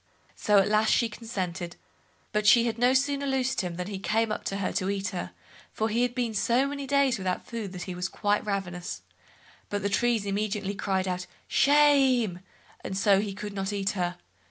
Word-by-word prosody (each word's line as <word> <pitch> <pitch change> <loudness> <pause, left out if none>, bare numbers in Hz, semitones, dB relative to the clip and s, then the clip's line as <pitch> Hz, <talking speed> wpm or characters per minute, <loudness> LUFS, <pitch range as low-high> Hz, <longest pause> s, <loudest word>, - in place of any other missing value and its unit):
So 210 -1 +3
at 195 - +5
last 215 +1 +3
she 235 - +3
consented; 185 -6 -5 0.6
but 210 0 0
she 235 +2 +7
had 230 -1 -2
no 245 +1 +4
sooner 280 +1 +1
loosed 265 -1 0
him, 180 -2 -4
than 180 +1 -4
he 195 0 -5
came 220 +2 0
up - - -3
to 195 - -2
her 200 - -1
to 185 - -1
eat 200 0 -1
her, 180 -3 -4 0.4
for 220 +1 -1
he 230 +3 +1
had 245 -1 0
been 240 -3 -1
so 235 +5 +2
many 280 -1 -4
days 275 -4 +2
without 185 -1 -2
food 225 -5 -5
that 180 -1 -5
he 185 - -5
was 180 +1 -3
quite 205 0 0
ravenous, 180 -4 -4 0.7
but 205 -1 -2
the 200 - +1
trees 230 0 +1
immediately 200 0 -2
cried 190 -1 -1
out 180 -1 -3 0.2
"shame", 270 -9 +4 0.4
and 190 - -4
so 195 0 +4
he 200 -2 -4
could 205 0 -6
not 195 0 -2
eat 200 -1 0
her. 180 -2 -2
210 Hz, 205 wpm, -27 LUFS, 190-240 Hz, 0.7 s, she